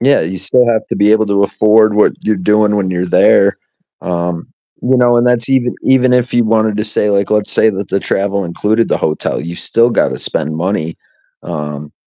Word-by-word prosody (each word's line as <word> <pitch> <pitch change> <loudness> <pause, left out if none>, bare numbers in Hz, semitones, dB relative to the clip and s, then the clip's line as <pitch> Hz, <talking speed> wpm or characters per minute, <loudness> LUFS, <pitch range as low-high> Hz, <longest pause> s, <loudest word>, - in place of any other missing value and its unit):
Yeah, 140 +3 +2
you 90 +3 -4
still 120 +6 +2
have 110 -2 -1
to - - -3
be 105 +1 +3
able 110 -1 +2
to 100 0 0
afford 110 +1 +2
what 105 - +3
you're 110 -1 -1
doing 105 +3 +1
when 95 -2 -2
you're 90 0 -2
there, 90 - +2 0.4
um, 85 -1 -4 0.3
you 130 +1 +1
know, 120 -1 +3
and 120 - +1
that's 120 0 +1
even 125 -2 0
even 130 -1 +2
if 125 0 0
you 120 - +2
wanted 110 -1 0
to 105 - -1
say, 105 -1 +1
like 100 0 -1
let's 105 -1 +1
say - - +3
that 100 0 -6
the 100 - -1
travel 100 0 -2
included 105 +6 -1
the - - 0
hotel, 75 -1 -2
you 85 +3 -7
still 115 +6 +2
gotta - - -1
spend 80 +2 -2
money, 85 -2 -3 0.5
um 75 -3 -7
105 Hz, 210 wpm, -13 LUFS, 90-115 Hz, 0.5 s, be